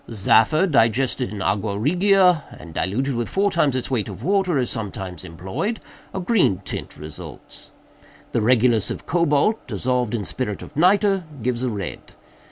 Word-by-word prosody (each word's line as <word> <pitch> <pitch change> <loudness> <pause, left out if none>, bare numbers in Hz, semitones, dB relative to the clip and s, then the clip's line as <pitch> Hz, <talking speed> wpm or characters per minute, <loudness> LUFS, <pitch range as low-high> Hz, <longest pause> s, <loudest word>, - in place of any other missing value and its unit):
Zaffre, 115 - +3
digested 130 - +2
in 100 -3 -4
aqua 100 0 -1
regia, 180 - +3
and 85 -2 -11
diluted 130 - -1
with 120 -1 -2
four 200 +1 +1
times 150 -6 +2
its 130 +1 -3
weight 115 -5 -1
of - - -9
water, 190 -4 +1
is 125 -2 +1
sometimes 95 -6 -6
employed; 95 - -4 0.3
a 190 - -4
green 185 - +2
tint - - -6
results. 75 +1 -10 0.6
The 115 - 0
regulus 115 -1 +3
of - - -6
cobalt, 170 +5 +1
dissolved 125 +1 -1
in 105 -4 -3
spirit 105 -3 -4
of 150 - -12
nitre, 195 +3 +3 0.2
gives 125 0 -1
a 130 - 0
red. 100 -5 -6
125 Hz, 160 wpm, -22 LUFS, 105-175 Hz, 0.6 s, Zaffre